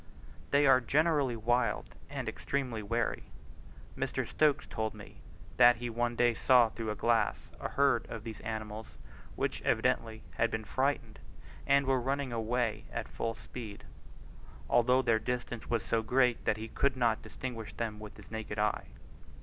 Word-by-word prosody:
They 140 +1 +4
are 130 -2 +6
generally 145 -1 +2
wild 120 +3 0 0.2
and - - -4
extremely 115 - -2
wary. 115 +2 -1 0.7
Mr. - - -2
Stokes 150 -2 +2
told 110 -1 -3
me, - - -12 0.4
that 120 -1 +8
he 120 0 -4
one 120 +1 -1
day 120 0 +3
saw 120 0 +5
through 115 -1 -5
a 105 - -1
glass 115 -1 +1
a - - -3
herd 140 -4 +2
of 110 -2 -6
these 110 -2 -7
animals 110 -1 -5 0.5
which - - -2
evidently 110 -1 0
had 115 - +3
been 110 -1 -3
frightened, 130 -2 -1 0.5
and 140 0 +4
were 130 -1 +2
running 135 0 -1
away 115 -1 -1
at 115 -1 -4
full 115 0 -3
speed, 110 -5 -9 0.8
although 125 +2 +4
their 115 -3 +3
distance 120 0 -4
was 115 -5 0
so 115 - +1
great 125 +1 +2
that 105 - +2
he 110 +1 -5
could 135 +3 0
not 115 -3 +2
distinguish 115 -4 -6
them 110 -2 -3
with 105 0 -10
his - - -14
naked 110 -1 -5
eye. 105 0 0
115 Hz, 160 wpm, -32 LUFS, 110-125 Hz, 0.8 s, that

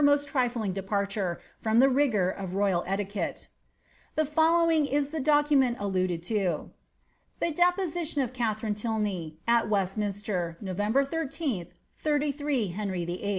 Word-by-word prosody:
most 285 0 +4
trifling 245 -8 0
departure 195 -1 -2 0.2
from 220 0 +1
the 260 +3 +7
rigour 255 -9 +2
of 185 0 -4
royal 195 -3 +2
etiquette. 200 +1 -3 0.7
The 310 - +2
following 320 0 +3
is 285 +1 0
the 320 - -3
document 290 -3 +3
alluded 185 -4 -1
to: 200 - -4
^^ 185 -6 0 0.7
The 335 - 0
deposition 350 -3 +1
of 255 - -5
Kt* - - -16
■ 220 -3 0
tharine 215 -1 -1
Tylney, 205 -7 -2
at 235 -2 +3
Westminster, 195 -3 -1
November 210 +7 +1
13th, 275 - -2 0.3
33 290 -6 0
Henry 185 -2 -3
VIII.' 180 +4 -3
220 Hz, 140 wpm, -28 LUFS, 195-290 Hz, 0.7 s, the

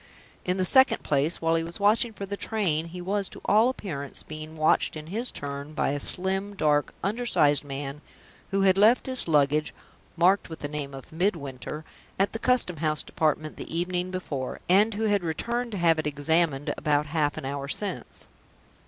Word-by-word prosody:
In 180 +1 0
the 185 - +1
second 260 +6 +4
place, 145 +3 0
while 165 0 +2
he 165 0 +1
was 170 +3 -7
watching 215 +3 +3
for 200 -2 -7
the 200 +1 -4
train, 180 -8 -1
he 180 +2 -8
was 195 +1 -1
to - - -12
all 220 +4 +4
appearance 145 - -5
being 155 +1 -9
watched 155 +1 +2
in 155 -1 -7
his 225 +9 0
turn, 140 +1 -6
by - - 0
a 145 +1 -2
slim, 190 +6 +4
dark, 150 -4 +1
undersized 200 -10 +2
man, 140 +1 -6 0.5
who 195 0 0
had 190 0 +4
left 220 +5 +5
his 260 -6 +2
luggage 150 -1 +2 0.4
(marked 185 +3 +3
with 160 - -9
the 145 - -3
name 145 -2 -5
of 135 - -11
Midwinter) 155 -4 -3 0.3
at 195 +1 +1
the 225 - -4
custom 235 -9 +2
house 155 0 -1
department 155 0 -1
the 165 - -6
evening 180 +1 -2
before, 145 -8 -4
and 205 +4 +4
who 220 - -2
had 205 -2 +2
returned 235 +9 -2
to - - -3
have 165 -2 +3
it 155 - -2
examined 145 0 0
about 150 0 +1
half 150 -1 -1
an - - -5
hour 140 0 -4
since. 200 +7 -4
165 Hz, 190 wpm, -26 LUFS, 150-200 Hz, 0.5 s, left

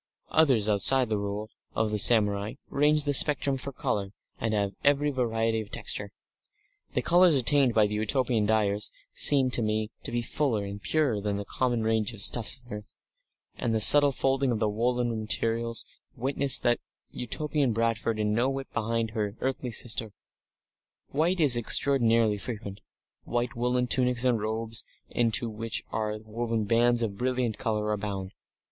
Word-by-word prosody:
Others 130 -10 +3
outside 110 +4 +3
the 105 - 0
Rule 100 +2 -5 0.2
of 110 -1 0
the 105 - 0
samurai 105 -2 +4 0.2
range 150 +1 +3
the 145 -1 -1
spectrum 140 0 +3
for 135 +1 -6
colour, 100 -5 -3 0.3
and 115 - -2
have 100 -1 -1
every 145 +1 +2
variety 115 -3 -1
of 105 - -11
texture; - - -4 0.8
the - - 0
colours 175 -3 +4
attained 130 -1 +2
by 110 -1 +4
the 105 - -4
Utopian 110 0 0
dyers 105 -1 0 0.2
seem 135 -3 +3
to 120 - 0
me 110 0 -2
to - - -8
be 120 0 -2
fuller 115 -5 -1
and 100 +1 -8
purer 135 -9 0
than 100 0 -2
the 100 - -6
common 120 +1 -1
range 110 0 -1
of 105 -3 +4
stuffs 120 +1 +5
on 120 - -10
earth; 105 -1 -10 0.6
and 115 -2 -2
the - - +1
subtle 145 +6 +7
folding 135 0 0
of 115 - -1
the 110 0 0
woollen 120 +1 -1
materials 115 +1 -2 0.3
witness 135 +1 +3
that 120 -1 +1 0.3
Utopian 140 +3 -2
Bradford 115 0 -1
is 105 - -1
no 115 +5 +1
whit 135 0 -6
behind 115 0 -2
her 105 -2 -3
earthly 130 -1 -3
sister. 115 -2 -1 1.0
White 170 +6 0
is 145 -6 +6
extraordinarily 115 -3 +2
frequent; 105 -3 -7 0.4
white 120 0 -3
woollen 125 +1 0
tunics 125 0 0
and 120 -4 +1
robes 110 +1 -3 0.3
into 115 0 +1
which 115 0 -4
are 110 -1 -3
woven 115 0 -3
bands 120 +2 +2
of 100 -3 -4
brilliant 125 -3 -2
colour, 105 -1 -2
abound. 100 -2 -4
115 Hz, 165 wpm, -27 LUFS, 105-130 Hz, 1.0 s, subtle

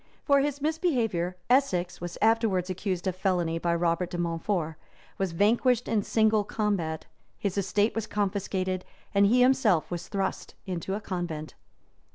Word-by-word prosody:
For 280 -2 +4
this 285 0 -2
misbehavior, 235 - 0
Essex 195 -11 +1
was 175 0 -5
afterwards 215 -5 +2
accused 185 -1 -3
of 185 -2 -1
felony 180 -4 0
by 170 0 +1
Robert 170 +1 0
de 175 - -5
Montfort; 165 -1 -1 0.4
was 195 -2 0
vanquished 230 +7 +2
in 215 - +1
single 220 0 +2
combat; 195 -7 -2 0.3
his 200 -3 -2
estate 205 +2 +1
was 225 -1 -3
confiscated; 190 -2 -1 0.3
and 200 0 +5
he 245 +4 +4
himself 245 -11 +3
was 175 -1 -4
thrust 195 -2 -3
into 185 0 -3
a 210 - -4
convent. 175 -6 -4
195 Hz, 150 wpm, -28 LUFS, 175-220 Hz, 0.4 s, and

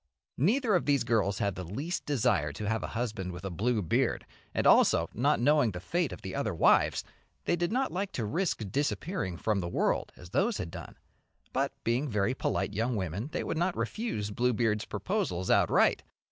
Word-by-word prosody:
Neither 220 - +3
of 180 - +2
these 140 -4 +3
girls 105 -4 +1
had 100 -1 0
the 90 - -6
least 140 - -4
desire 120 - +1
to 105 +7 -5
have 115 +1 0
a - - -3
husband 105 -6 -3
with 90 +2 -8
a 95 - -3
blue 110 +4 0
beard, 80 - 0 0.3
and - - -1
also, 85 - +5
not 140 +6 +2
knowing 145 0 +4
the 90 -4 -5
fate 165 - -1
of - - -9
the - - -5
other - - -1
wives, - - +4 0.4
they - - +2
did 175 +2 -1
not 260 +3 0
like 195 +2 -2
to 115 - -2
risk 165 - -1
disappearing 145 - -1
from 105 +2 0
the 85 -2 -3
world - - 0
as 85 0 -12
those 205 - +1
had 85 - -5
done, - - -9 0.6
but - - +1
being 125 +5 0
very 105 +2 +1
polite 115 - -1
young 115 +4 0
women 100 - -3
they - - -2
would 160 - -2
not 175 +1 0
refuse 110 - -2
Bluebeard's 115 -2 +1
proposals 90 +1 -2
outright. - - +4
115 Hz, 195 wpm, -30 LUFS, 100-155 Hz, 0.6 s, also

